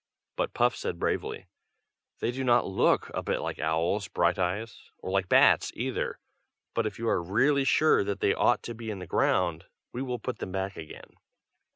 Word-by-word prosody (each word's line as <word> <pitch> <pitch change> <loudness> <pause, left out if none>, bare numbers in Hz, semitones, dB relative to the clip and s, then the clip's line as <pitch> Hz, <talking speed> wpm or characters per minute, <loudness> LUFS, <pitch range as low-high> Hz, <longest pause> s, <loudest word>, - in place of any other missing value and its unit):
But - - -2
Puff 120 0 +3
said 85 - -4
bravely: - - -2 0.8
"They 120 - 0
do 130 +2 -4
not 120 -1 +4
look 95 - +1
a - - -2
bit - - -1
like - - -4
owls, 85 +5 0
Brighteyes, 90 +5 -1
or 95 - -6
like 95 -1 0
bats - - +5
either; - - -2 0.6
but 115 -2 0
if - - -6
you 115 - -3
are 85 - +2
really 135 +11 +2
sure 155 -3 +4
that 100 0 -3
they 100 - +2
ought 120 - +2
to 120 - -5
be 115 0 -7
in 105 - -4
the 90 - -7
ground, 85 -1 +1 0.3
we 125 - -4
will 125 -2 -2
put 125 +2 -5
them - - -5
back 95 +1 -3
again." 80 - -11
100 Hz, 190 wpm, -28 LUFS, 90-120 Hz, 0.8 s, bats